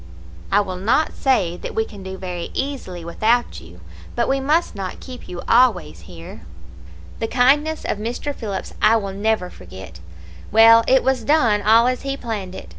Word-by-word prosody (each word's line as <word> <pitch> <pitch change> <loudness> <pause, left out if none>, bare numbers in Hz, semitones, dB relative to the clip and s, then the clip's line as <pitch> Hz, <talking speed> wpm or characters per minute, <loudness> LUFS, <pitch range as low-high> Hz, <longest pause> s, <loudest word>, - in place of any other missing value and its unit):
I 205 - +4
will 185 -2 -5
not 235 +11 +1
say 190 -11 0
that - - -8
we 220 - 0
can 205 -3 -12
do 190 0 -7
very 180 -2 -6
easily 220 -12 -5
without 225 +8 0
you, 85 +2 -15 0.3
but - - 0
we 270 0 +1
must 305 +6 0
not 195 -2 -6
keep 255 -1 -11
you 175 -1 -7
always 225 - +2
here.' 85 -3 -11 0.8
"The 225 - -2
kindness 290 +6 +2
of 205 - -2
Mr. 240 +6 -4
Phillips 205 -7 -6
I 225 - +5
will 200 -3 -2
never 205 -2 -1
forget. 90 -2 -12 0.5
Well, 230 +1 +7
it 260 0 +4
was 260 -2 0
done 230 -6 +2
all 225 +3 +5
as 255 0 0
he 275 0 -4
planned 205 -7 -5
it. - - -10
220 Hz, 180 wpm, -20 LUFS, 185-255 Hz, 0.8 s, Well